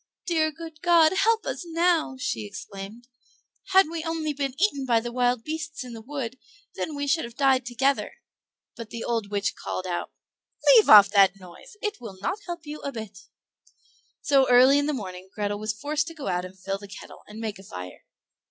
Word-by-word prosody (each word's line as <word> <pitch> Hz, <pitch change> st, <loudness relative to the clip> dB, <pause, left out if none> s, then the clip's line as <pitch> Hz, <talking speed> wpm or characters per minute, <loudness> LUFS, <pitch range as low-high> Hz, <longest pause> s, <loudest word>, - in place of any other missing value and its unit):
"Dear 315 Hz, -3 st, +1 dB
good 320 Hz, -1 st, -10 dB
God, 335 Hz, -2 st, +5 dB
help 450 Hz, +3 st, +2 dB
us -, -, -4 dB
now!" 335 Hz, -4 st, +1 dB
she 115 Hz, -, -2 dB
exclaimed. 200 Hz, -, -9 dB, 0.6 s
"Had 385 Hz, -1 st, +5 dB
we 325 Hz, 0 st, -5 dB
only 325 Hz, -2 st, -2 dB
been 275 Hz, -1 st, -4 dB
eaten 330 Hz, -8 st, +1 dB
by 240 Hz, -3 st, +3 dB
the 240 Hz, +1 st, -5 dB
wild 245 Hz, -1 st, +1 dB
beasts 310 Hz, -1 st, -5 dB
in 250 Hz, -1 st, -9 dB
the 225 Hz, -, -8 dB
wood 260 Hz, -1 st, -5 dB, 0.3 s
then 310 Hz, -, -4 dB
we 285 Hz, 0 st, -2 dB
should 320 Hz, +3 st, +1 dB
have 235 Hz, 0 st, -8 dB
died 265 Hz, -2 st, +2 dB
together." 265 Hz, +3 st, 0 dB, 0.6 s
But 230 Hz, -2 st, -8 dB
the 230 Hz, +1 st, -6 dB
old 230 Hz, -4 st, -2 dB
witch 200 Hz, -1 st, -1 dB
called 185 Hz, -, -5 dB
out, 175 Hz, -1 st, -3 dB, 0.6 s
"Leave 445 Hz, -, +6 dB
off 205 Hz, -2 st, +10 dB
that 195 Hz, -1 st, +4 dB
noise; 195 Hz, -, -14 dB
it 420 Hz, -1 st, -3 dB
will 205 Hz, -5 st, -9 dB
not 370 Hz, -, -2 dB
help 345 Hz, -2 st, -6 dB
you 300 Hz, +1 st, -7 dB
a 280 Hz, -, -4 dB
bit." 220 Hz, -5 st, -8 dB, 1.0 s
So 275 Hz, -2 st, +4 dB
early 255 Hz, +3 st, +7 dB
in 285 Hz, -, 0 dB
the 300 Hz, -, 0 dB
morning 190 Hz, -6 st, -7 dB
Grethel 205 Hz, -1 st, -2 dB
was 215 Hz, 0 st, -2 dB
forced 295 Hz, +3 st, -1 dB
to 330 Hz, -, -8 dB
go 290 Hz, -3 st, -8 dB
out 180 Hz, 0 st, -1 dB
and 185 Hz, +1 st, -12 dB
fill 195 Hz, +1 st, -4 dB
the 200 Hz, -, -10 dB
kettle, 200 Hz, -, -11 dB
and 210 Hz, +1 st, -10 dB
make 215 Hz, -3 st, -4 dB
a -, -, -12 dB
fire. 90 Hz, -, -9 dB
260 Hz, 200 wpm, -26 LUFS, 210-315 Hz, 1.0 s, off